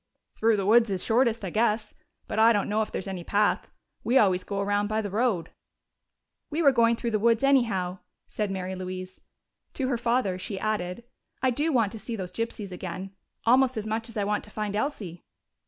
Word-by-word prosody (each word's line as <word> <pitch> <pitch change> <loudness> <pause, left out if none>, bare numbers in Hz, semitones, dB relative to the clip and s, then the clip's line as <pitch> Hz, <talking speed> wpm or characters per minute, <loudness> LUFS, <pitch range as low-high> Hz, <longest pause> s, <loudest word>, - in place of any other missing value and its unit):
"Through 225 -1 +2
the 195 - -1
woods 225 +2 +5
is 190 -2 -2
shortest, 230 -2 +2
I 180 - -4
guess. 215 -1 +1 0.3
But 220 - -2
I 225 +1 +7
don't 205 -2 0
know 215 +1 +1
if 215 - -3
there's 190 - -4
any 185 -2 -5
path. 205 +3 +1 0.3
We 250 +3 +3
always 185 -5 +4
go 200 -1 -4
around 205 +1 +1
by 215 +1 0
the 205 -3 -3
road." 210 -5 0 1.0
"We 315 +3 -1
were 280 - +7
going 235 -2 +4
through 235 0 -3
the 215 - +1
woods 230 +2 +3
anyhow," 205 -10 +2 0.3
said 210 -2 -2
Mary 190 -1 -3
Louise. 185 0 -6 0.5
To 260 -2 -1
her 245 -3 0
father 235 -6 +1
she 195 +1 -5
added, 210 -1 -2 0.4
"I 260 - +4
do 295 +6 0
want 230 -7 +2
to 225 - -8
see 230 +2 -5
those 185 -4 -5
gypsies 220 -1 -4
again, 185 +1 -6 0.3
almost 255 +1 +4
as 215 - -3
much 225 +1 -3
as 230 - -8
I 205 - +1
want 210 +1 -1
to - - -13
find 210 -1 -3
Elsie." 205 - -3
215 Hz, 205 wpm, -27 LUFS, 195-235 Hz, 1.0 s, I